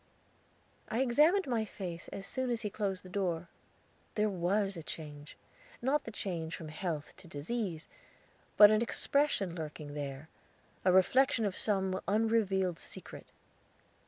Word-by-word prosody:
I 235 +3 0
examined 300 +10 +4
my 235 -4 0
face 180 -5 -6
as 195 - -6
soon 260 +3 -1
as 235 -1 -1
he 210 - -2
closed 195 -3 -2
the - - -11
door. 175 -3 -2 0.7
There 210 -1 +2
was 195 +2 +1
a 165 - -6
change. 150 -1 -8 0.4
Not 270 +5 +1
the 225 - -6
change 170 -6 -3
from 160 - -8
health 155 -1 -4
to 175 - -13
disease, 165 +2 -3 0.7
but 210 0 +10
an 215 +1 +3
expression 235 - +1
lurking 150 -3 -6
there 140 0 -5 0.6
a 185 - +5
reflection 230 +6 +4
of 195 -2 -1
some 190 -2 +1
unrevealed 200 -4 +2
secret. - - -8
195 Hz, 140 wpm, -33 LUFS, 165-225 Hz, 0.7 s, but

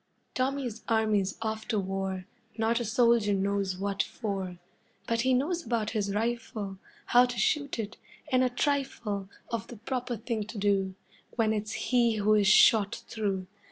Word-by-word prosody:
Tommy's 255 -4 -2
army's 215 -4 +1
off 220 0 -3
to 220 - 0
war 190 -1 -2 0.3
Not 225 +1 +2
a 240 - -2
soldier 230 -2 +3
knows 195 -1 0
what 200 0 0
for. 195 -5 -4 0.5
But 230 0 +1
he 260 +2 +2
knows 335 +7 0
about 225 -5 -1
his 200 -3 -1
rifle, 215 -3 -2 0.3
How 245 +1 +6
to 245 -1 -5
shoot 285 +6 +1
it, 220 -1 -4 0.3
and 255 0 +4
a 255 - +3
trifle 245 -7 -1 0.2
Of 230 -1 -3
the 240 - -9
proper 245 +1 -3
thing 220 -1 -3
to 225 - -8
do 195 -2 +1 0.4
When 220 -2 +2
it's 215 0 -3
he 240 -3 +2
who 210 0 +3
is 205 -2 +4
shot 215 0 +5
through. 200 -4 -2
220 Hz, 160 wpm, -29 LUFS, 200-240 Hz, 0.5 s, How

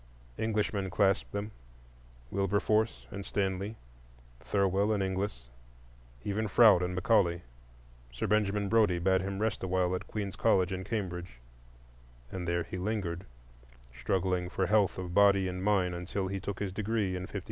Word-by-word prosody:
Englishmen 105 -3 0
clasped 95 +1 +1
them,—Wilberforce - - -3
and 100 - -5
Stanley, 100 +2 -2 0.6
Thirwell 100 - +1
and 105 -2 +1
Ingles, 95 -11 -3 0.7
and - - -8
even 105 +2 0
Froude 105 -3 +6
and 90 0 -2
Macaulay; 90 -4 +2 0.7
Sir - - -3
Benjamin 105 0 +1
Brodie 105 -4 +3
bade 95 +2 +2
him 100 0 -3
rest 110 +1 -1
awhile 95 -1 +1
at 90 - -4
Queen's 100 -3 -4
College 95 0 +2
in 95 0 -4
Cambridge, 90 - -4 0.9
and 90 -2 -4
there 85 0 0
he 95 - -6
lingered, 95 -3 -3 0.7
struggling 90 +8 -1
for 95 0 0
health 105 0 +2
of 90 -2 -5
body 100 -1 +5
and 90 0 -4
mind, 95 -3 +2
until 90 +2 -3
he 100 0 -3
took 100 0 -5
his 100 -2 -2
degree 105 -2 -1
in 90 0 -5
'53. - - -4
95 Hz, 145 wpm, -31 LUFS, 90-100 Hz, 0.9 s, Froude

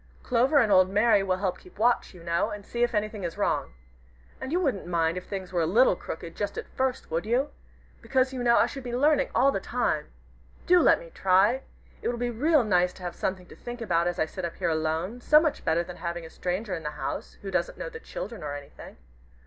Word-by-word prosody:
Clover 255 +4 +3
and 230 -7 +4
old 185 -1 +6
Mary 210 +1 +4
will 185 0 0
keep 180 - -17
watch, 235 +3 +2
you 170 - -13
know, 170 0 0
and 205 -1 -7
see 240 - -4
if 240 -1 +2
anything 210 -1 -2
is 170 -1 -4
wrong. - - -1 0.6
And 260 - -5
you 350 - +2
wouldn't 260 - -1
mind 165 -1 +1
if 185 - -6
things 190 -2 -6
were 175 - +2
a 160 - +1
little 225 +3 +5
crooked 165 -1 -7
just 205 -1 -3
at - - -5
first, 260 -6 -2
would 165 +1 0
you? 250 +7 0 0.5
because, 265 0 +1
you 255 - -3
know, 235 -1 +4
I - - +5
should 275 - -6
be 245 -1 -4
learning 285 +1 +3
all 275 +2 +5
the 195 - -1
time. 190 -9 -1 0.6
Do 360 0 +6
let - - +5
me - - -12
try! 195 +7 +3 0.4
It - - -2
will 240 - -1
be 240 0 -1
real 295 +4 +3
nice 180 -4 +2
to 185 - -13
have 175 -1 -4
something 185 -1 -3
to - - -14
think 240 0 -8
about 175 -7 +1
as 175 0 -2
I 160 - +2
sit 185 +3 -7
up 170 -1 -3
here 175 -3 -1
alone, 160 +8 -1
so 300 +4 +6
much 310 -2 -1
better 170 +2 +2
than 175 0 -9
having 170 -1 -4
a 160 - -11
stranger 185 +3 -3
in 165 - -3
the 150 -1 -5
house - - -5
who 195 - -5
doesn't - - -1
know - - -5
the 455 - -9
children 460 - -7
or 145 -1 -4
anything. 145 -1 -11
205 Hz, 240 wpm, -27 LUFS, 175-250 Hz, 0.6 s, old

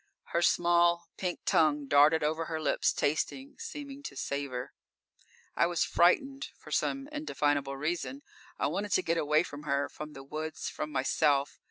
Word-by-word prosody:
Her 170 - +2
small, 170 0 +3
pink 180 -2 -3
tongue 150 -2 +3
darted 145 +3 +5
over 160 +2 0
her 160 -1 -3
lips, 155 - +2
tasting, 265 - -1
seeming 290 -12 -7
to - - -7
savor._ 140 -3 -3 0.9
_I 170 - +3
was 175 -2 +1
frightened, 270 +10 +2
for - - -14
some 275 0 0
indefinable 145 - -1
reason. 175 - -3 0.3
I - - 0
wanted 205 0 -1
to 185 - +3
get 165 0 +1
away 150 +1 +3
from 145 -3 -8
her, 140 -1 0
from 150 0 -8
the 135 - -9
woods, 155 +3 -5
from 150 0 -5
myself. 140 +1 +1
160 Hz, 160 wpm, -30 LUFS, 145-180 Hz, 0.9 s, darted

